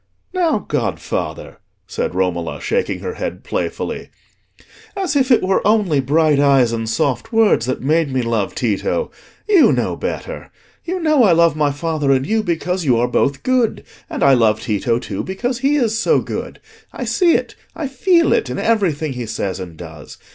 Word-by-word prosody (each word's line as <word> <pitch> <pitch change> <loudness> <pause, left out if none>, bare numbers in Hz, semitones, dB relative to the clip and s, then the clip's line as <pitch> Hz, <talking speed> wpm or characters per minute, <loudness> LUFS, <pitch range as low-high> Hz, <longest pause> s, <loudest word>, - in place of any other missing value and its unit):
"Now, 350 -4 +2
godfather," - - -3 0.3
said 485 +1 -3
Romola, - - -1
shaking 475 +1 -1
her 455 - -4
head - - -5
playfully, - - -4 0.9
"as 380 -6 -1
if 265 -2 +2
it 245 - +4
were 190 +1 +2
only 205 -8 +2
bright 150 +2 +2
eyes 135 -4 +4
and 115 -1 -3
soft 125 +1 -1
words 225 - +3
that 130 - -2
made 155 +1 +1
me 130 -1 0
love 115 -4 -1
Tito! 120 - -1 0.4
You 395 -6 +5
know - - 0
better. - - -5 0.3
You 365 +2 -3
know 310 -5 +3
I 195 -6 +5
love 170 -2 +4
my 150 -2 +1
father 150 -1 -1
and 135 0 +2
you 220 +5 +1
because 180 -1 -2
you 130 -6 +3
are 120 +1 +2
both 135 +2 0
good, 255 -3 +1 0.3
and - - -3
I 140 - +6
love 110 -4 +3
Tito 115 +2 0
too 100 -5 -5
because 240 +6 -3
he 275 +2 +2
is 230 -5 +1
so - - +3
good. - - -6 0.3
I - - -5
see 350 -4 +3
it, - - -2 0.2
I 305 - -3
feel 335 +6 +3
it, 130 - 0
in 125 - -4
everything 165 -10 0
he 125 -2 -5
says 100 -4 -3
and 85 -3 -8
does. 80 -3 -11
160 Hz, 180 wpm, -18 LUFS, -, 0.9 s, I